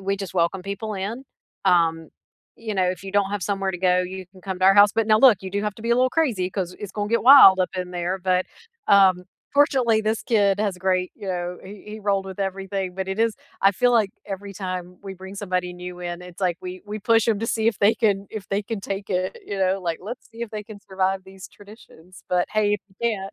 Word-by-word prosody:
we 195 +1 -1
just 195 -2 -7
welcome 180 +1 +1
people 200 +2 -5
in. 215 +8 -5 0.4
Um, 165 -3 +2 0.5
you 220 -2 -5
know, 185 -1 +2
if 185 0 -7
you 195 - -7
don't 200 -1 +2
have 205 -3 -3
somewhere 195 0 -1
to 180 - -6
go, 180 0 +3
you 185 +1 -6
can 190 - -16
come 190 0 -5
to 185 - +1
our 195 0 +7
house, 205 0 +7
but 225 -1 0
now, 215 -1 +5
look, 240 -6 +7
you 190 - -6
do 200 +2 -2
have 210 -1 -2
to 220 - -12
be 230 - -2
a - - +5
little 255 +1 +2
crazy 230 - 0
'cause 180 -2 -4
it's 205 -2 -7
gon' 205 -1 -3
get 230 +2 +1
wild 235 -8 +9
up 180 - 0
in 180 -1 -4
there, 175 +2 -2
but, 185 0 +1 0.4
um, 190 -2 +5 0.3
fortunately, 260 -6 +3
this 220 +1 -1
kid 205 -4 +2
has 200 -3 -1
great 185 0 0
you 200 - -10
know, 180 0 -3
he 195 +1 -11
he 215 +1 -8
rolled 200 -2 0
with 190 0 -8
everything, 195 -1 -3
but 190 0 -4
it 190 +2 -3
is 225 -1 +2 0.3
I 195 - +5
feel 245 +4 +2
like 215 -4 +3 0.2
every 195 +1 -6
time 180 -2 -6
we 195 -1 -7
bring 190 +1 -10
somebody 180 -3 -2
new 180 0 -8
in, 175 0 -5
it's 180 +1 -12
like 180 -3 +1
we 185 0 -8
we 210 +1 -5
push 225 +2 +2
‘em 215 -3 +2
to 225 - -2
see 225 -1 0
if 225 - -2
they 205 +2 +4
can 200 -2 +1
if 210 -3 -7
they 200 +1 -1
can 215 -1 -5
take 195 0 -5
it, 185 0 -1
you 200 - -4
know, 190 0 +1
like, 170 -2 -3
let's 240 +6 -8
see 230 +1 -8
if 235 - -5
they 210 -1 -5
can 210 -1 -11
survive 190 0 -1
these 190 0 -12
traditions, 200 -4 -16
but, 180 -1 +1
hey, 215 -1 +1
if 210 - -5
you 190 - -26
can't 200 -4 -1
195 Hz, 255 wpm, -23 LUFS, 185-210 Hz, 0.5 s, wild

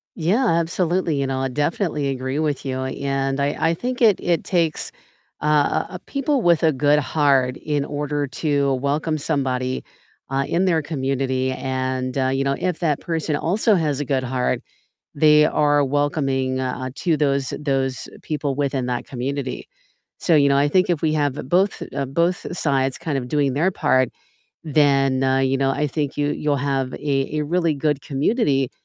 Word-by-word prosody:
Yeah, 195 +10 +1
absolutely, 170 0 +1
you 135 - 0
know, 130 0 -2
I 135 - 0
definitely 150 +1 -1
agree 130 +1 -3
with 150 -3 -1
you, 130 -1 -2
and 135 0 -2
I 140 +1 0 0.2
I - - +1
think 250 +8 -4
it 220 -5 +4
it 170 -2 +1
takes, 165 -4 0 0.5
uh, - - -3 0.4
uh, 180 - -6
people 275 -2 0
with 170 -2 +4
a 160 -1 +4
good 145 +2 +3
heart 135 -3 +2
in 145 -2 -1
order 145 0 -2
to 140 -1 0
welcome 150 +4 -1
somebody, 130 -4 -1 0.5
uh, 135 0 0
in 180 +3 +1
their 165 -4 +2
community, 130 -3 -1
and, 130 0 -3
uh, 130 -1 +2
you 135 +1 0
know, 140 0 0
if 180 -3 -1
that 155 -5 0
person 160 -3 -2
also 205 +8 +2
has 150 -5 0
a 145 - -2
good 130 -1 0
heart, 125 0 -1 0.5
they 150 0 +5
are 145 -1 +3
welcoming, 135 -2 0
uh, 130 0 -3
to 165 -5 0
those 140 -3 0
those 135 -2 -1
people 145 -3 -2
within 135 -3 -1
that 125 -1 -3
community. 135 +1 -4 0.5
So, 170 - +2
you 140 -2 +5
know, 140 - +3
I 145 +1 +3
think 185 +4 +2
if 165 -3 0
we 155 -1 +2
have 145 -3 +1 0.2
both, 190 +3 +2
uh, 140 -1 -1
both 170 +6 0
sides 135 -4 +1
kind 155 -5 -2
of 125 -1 -5
doing 140 -2 +1
their 170 +6 +2
part, 130 -7 +2 0.6
then, 135 -3 +3
uh, 130 0 +2
you 135 0 +1
know, 135 0 +2
I 150 +2 0
think 145 0 -3
you, 145 0 0
you'll 150 -1 0
have 135 -1 -1
a 140 +1 -1
a - - -1
really 165 0 +1
good 145 0 0
community 140 - +1
145 Hz, 180 wpm, -22 LUFS, 135-155 Hz, 0.6 s, they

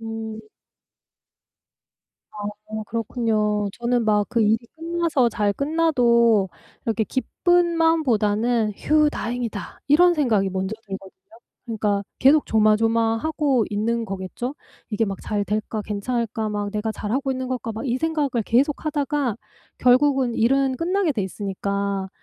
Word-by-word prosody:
음. 225 -1 -6 2.0
아. - - -8 0.3
어 220 0 -3
그렇군요. 215 -2 -1
저는 240 +1 0
막 210 -1 +2
그 240 -1 0
일이 215 +1 +3 0.2
끝나서 330 -6 +1
잘 210 -1 0
끝나도 240 -9 +3 0.4
이렇게 225 -1 0
기쁜 345 - +1
마음보다는 235 -8 +2
'휴 305 0 +3
다행이다.' 235 -4 -4
이런 350 +5 +6
생각이 220 - +1
먼저 190 +2 -2
들거든요. 195 -1 -8 0.5
그러니까 210 -4 -1 0.2
계속 285 +3 +5
조마조마하고 225 +5 +2
있는 230 +3 0
거겠죠? 195 +6 -5 0.4
'이게 215 +1 +1
막 195 -1 -3
잘 205 -1 -1
될까? 215 +1 -2
괜찮을까? 220 +1 -2
막 205 -1 -2
내가 215 +2 -2
잘하고 255 +7 -2
있는 260 0 -4
걸까?' 250 -3 -3
막 220 - -6
이 245 -1 0
생각을 315 0 0 0.2
계속하다가 285 0 0 0.4
결국은 255 -1 +3
일은 265 +3 +2
끝나게 355 +2 +1
돼 220 -6 -2
있으니까 200 0 -3
230 Hz, 285 characters per minute, -23 LUFS, 210-275 Hz, 2.0 s, 이런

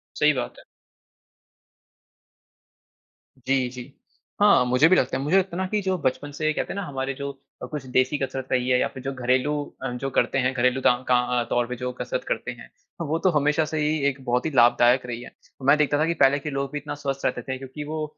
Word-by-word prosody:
सही - - +4
बात - - -4
है। - - -16 2.8
जी, 135 -1 +2
जी। 125 +2 -10 0.5
हाँ, 205 -11 +6
मुझे 125 +5 +4
भी 185 - +5
लगता 130 - +1
है, 135 - -3
मुझे 160 +7 +3
लगता 190 -2 0
है - - -3
ना - - 0
कि 210 +2 0
जो 190 -1 0
बचपन 145 -1 -2
से 155 0 +2
कहते - - -3
हैं - - -8
ना - - -3
हमारे 135 -1 -3
जो 140 0 -3 0.4
कुछ 150 -3 -5
देसी 130 +3 +3
कसरत 135 -1 -4
रही 125 0 +1
है 125 0 +4
या - - +2
फ़िर 130 - -10
जो 135 +1 -3
घरेलू 130 +4 +2 0.3
अ, 135 - -1
जो 125 +3 -3
करते - - +2
हैं 130 - +1
घरेलू 125 +1 +1
ताँ 125 +1 +2
क - - +2
अ, 125 -1 +2
तौर 120 -1 +1
पे 125 - -4
जो 125 +1 -4
कसरत - - -3
करते - - -2
हैं, - - -12 0.3
वो 160 0 -1
तो 185 - +3
हमेशा 150 +2 +2
से 155 - -2
ही 150 +1 +1
एक 135 -1 -8
बहुत 125 0 0
ही 160 - -1
लाभदायक 120 +1 +5
रही 120 -1 -5
है। - - -10 0.4
मैं 145 - +7
देखता 145 -1 +2
था 155 - +3
कि 165 - 0
पहले 135 +2 +5
के 150 - -5
लोग 140 -1 -3
भी - - -2
इतना 145 +1 -6
स्वस्थ 135 0 -2
रहते - - 0
थे, 130 -1 -5
क्योंकि 135 +3 -8
वो 155 +1 -4
135 Hz, 235 wpm, -24 LUFS, 125-150 Hz, 2.8 s, मैं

